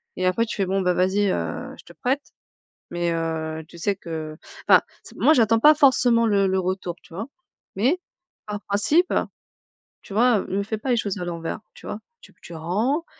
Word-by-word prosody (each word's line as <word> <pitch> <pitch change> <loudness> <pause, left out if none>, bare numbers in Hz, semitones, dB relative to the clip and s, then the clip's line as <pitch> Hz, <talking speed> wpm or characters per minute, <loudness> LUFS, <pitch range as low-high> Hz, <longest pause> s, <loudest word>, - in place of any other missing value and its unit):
et 185 - -1
après, 185 +6 +2
tu - - -4
fais: 195 - 0
«Bon, 195 +1 0
vas-y, 185 +3 +2
heu, - - -3
je - - -14
te - - -14
prête 270 +3 -1 0.7
mais, 175 0 -1
heu, 160 -1 -2
tu 170 - -14
sais 200 +4 0
que 160 -4 -6 0.3
enfin, - - +8 0.2
s - - -13
moi 310 - +5
j'attends 225 -4 +4
pas 300 +6 +7
forcément 245 -4 +4
le 200 -2 +3
le 190 0 +1
retour, 185 -1 -2
tu - - -18
vois 200 +6 -4 0.5
mais, 260 - +2 0.5
par 210 -1 -5
principe, 290 - +2 0.9
tu - - -11
vois, 235 +1 +4
heu, - - -5
me 200 +1 -1
fais 220 +2 -3
pas 240 +5 -5
les 245 - +3
choses 205 -2 -2
à 180 - -3
l'envers!», 170 -1 -4 0.2
tu - - -14
vois, 210 - -5 0.2
tu - - -17
tu 170 - -11
rends, 215 - -1
200 Hz, 200 wpm, -24 LUFS, 175-230 Hz, 0.9 s, enfin